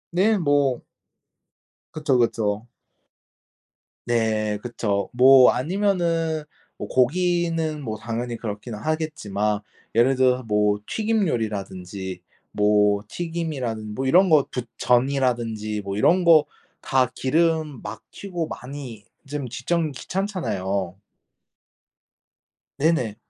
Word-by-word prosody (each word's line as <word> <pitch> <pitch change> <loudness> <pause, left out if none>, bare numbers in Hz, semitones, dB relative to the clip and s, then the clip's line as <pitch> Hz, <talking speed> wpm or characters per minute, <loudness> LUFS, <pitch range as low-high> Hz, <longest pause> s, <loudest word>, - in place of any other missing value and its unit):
네. 210 +4 +3
뭐 145 -6 +1 1.1
그쵸, 150 -4 +1
그쵸. 110 -2 0 1.4
네. 110 -3 0
그쵸. 105 -5 -2
뭐 130 +1 +7
아니면은 165 0 0 0.3
뭐 - - -6
고기는 165 +2 +1
뭐 110 -5 -4
당연히 120 +2 -4
그렇긴 110 +1 -6
하겠지만 105 -8 -2 0.3
예를 125 +4 +4
들어서 130 0 +2
뭐 105 -2 +1
튀김 220 -2 0
요리라든지 95 - -4 0.3
뭐 105 -1 +3
튀김이라든 140 -10 -4
뭐 135 - -2
이런 180 +8 +5
거 155 -3 +6
부 125 - -2 0.2
전이라든지 120 -5 0
뭐 100 0 -4
이런 180 - +4
거 160 -3 +7 0.4
다 130 -2 +2
기름 155 -1 0
막 110 +2 -7
튀고 175 -5 -5
많이 125 -5 -8 0.2
좀 140 -1 -4
집 120 +1 -9
정리 165 -4 +1
귀찮잖아요. 100 - -3 1.8
네네. 140 -8 +1
125 Hz, 210 characters per minute, -23 LUFS, 110-160 Hz, 1.8 s, 뭐